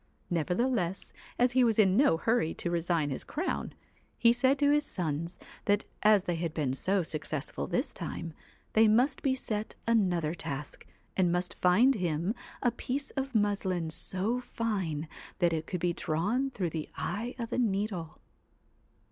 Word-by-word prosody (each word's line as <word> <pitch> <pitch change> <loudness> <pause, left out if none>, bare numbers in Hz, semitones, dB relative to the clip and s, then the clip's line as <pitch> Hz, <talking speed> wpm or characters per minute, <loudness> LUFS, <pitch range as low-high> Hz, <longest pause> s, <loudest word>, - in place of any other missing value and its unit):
Nevertheless, 180 - 0 0.2
as 245 0 +3
he 255 0 +4
was 225 -3 +3
in 195 -4 +5
no 255 - +5
hurry 225 -3 +1
to 175 - -2
resign 170 -3 0
his 130 - -3
crown, 330 +5 -3 0.4
he 235 0 +5
said 260 +3 +3
to 285 0 +4
his 295 0 +3
sons 170 - -3 0.3
that 205 0 +2 0.2
as 210 -3 +5
they 175 -2 -1
had 165 -1 -3
been 140 -5 0
so 190 +7 +1
successful 150 - -3
this - - -1
time, 165 -1 -5 0.4
they 220 0 +6
must 245 +6 +3
be 265 -2 +2
set 215 -4 -4
another 180 -9 +2
task, 150 -4 -6 0.3
and 180 -2 +3
must 175 0 -1
find 215 +10 +5
him 175 - -1 0.3
a 245 - +4
piece 265 +4 -3
of 270 -2 -4
muslin 190 -5 +1
so 190 +8 0
fine 195 -11 -2 0.3
that 175 -3 +2
it 160 -1 -2
could 180 - -3
be 175 0 +1
drawn 205 - 0
through 185 -10 -2
the 155 -1 -4
eye 220 +8 -3
of 230 -2 -4
a - - +1
needle. 195 -7 -1
190 Hz, 165 wpm, -30 LUFS, 165-235 Hz, 0.4 s, they